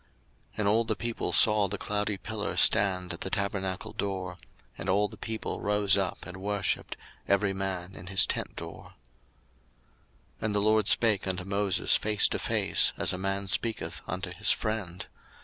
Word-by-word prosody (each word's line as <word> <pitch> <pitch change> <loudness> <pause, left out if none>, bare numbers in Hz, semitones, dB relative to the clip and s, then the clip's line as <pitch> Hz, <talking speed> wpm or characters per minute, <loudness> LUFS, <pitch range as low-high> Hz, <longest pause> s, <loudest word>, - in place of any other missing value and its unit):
02:033:010 - - -36 0.5
And 105 - 0
all 110 +3 +3
the 110 -1 -2
people 115 +1 -3
saw 105 -2 +4
the 105 +2 -4
cloudy 105 0 -2
pillar - - -5
stand 90 -3 +4
at 85 - -7
the - - -3
tabernacle 100 -2 -3
door: 95 -2 -4 0.4
and 95 - -6
all 100 +2 +2
the - - -12
people 110 -1 -5
rose 105 -1 +2
up 95 -2 -2
and 90 0 -9
worshipped, 100 +1 -2 0.3
every 100 0 +2
man 95 -1 -4
in 90 - -11
his 95 0 +5
tent - - -4
door. 85 0 -10 1.4
02:033:011 - - -5
And 105 -1 -1
the - - +3
LORD 110 0 +2
spake 105 -5 +4
unto 90 -1 -2
Moses 100 0 +2
face 105 -1 +3
to - - -2
face, - - +3
as - - +2
a 90 - -4
man 95 +1 -2
speaketh 95 -4 -1
unto 95 -1 -4
his 105 +5 0
friend. 100 -5 -2
100 Hz, 175 wpm, -28 LUFS, 95-105 Hz, 1.4 s, his